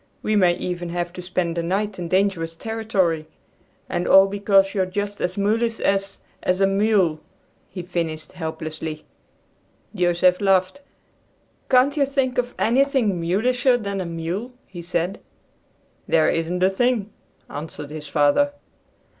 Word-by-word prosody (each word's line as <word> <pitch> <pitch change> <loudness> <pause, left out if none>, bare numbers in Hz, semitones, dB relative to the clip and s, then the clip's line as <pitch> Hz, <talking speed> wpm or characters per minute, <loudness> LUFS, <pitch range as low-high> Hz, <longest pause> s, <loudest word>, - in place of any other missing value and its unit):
We 215 - +1
may 180 -4 +4
even 175 -1 -4
have 175 0 -3
to 180 - -7
spend 180 -2 -2
the - - +1
night 195 +3 -2
in 175 - -4
dangerous 185 -3 0
territory, 190 -7 -1 0.6
and 175 - -2
all 195 0 +8
because 195 -1 +2
you're 190 -3 0
just 205 +2 -4
as 180 +2 -2
mulish 225 +3 +1
as, 195 0 0 0.2
as 180 +1 0
a 195 - +5
mule," 195 -5 +2 0.5
he 180 -1 -7
finished 165 -3 -4
helplessly. 160 -2 -6 0.9
Joseph 180 -1 +2
laughed. 195 +6 +2 0.9
"Can't 265 +3 +4
you 280 -2 +3
think 265 -2 0
of 245 0 -2
anything 240 -6 +2
mulisher 245 +8 +2
than 200 -4 -3
a - - -4
mule?" 170 +9 -4
he 175 -2 -9
said. 175 +3 -2 0.9
"There 160 -1 +3
isn't 170 +2 -1
a 190 - +4
thing," 225 0 0 0.4
answered 150 0 -7
his 155 -1 -7
father. 150 - +3
190 Hz, 140 wpm, -22 LUFS, 170-215 Hz, 0.9 s, all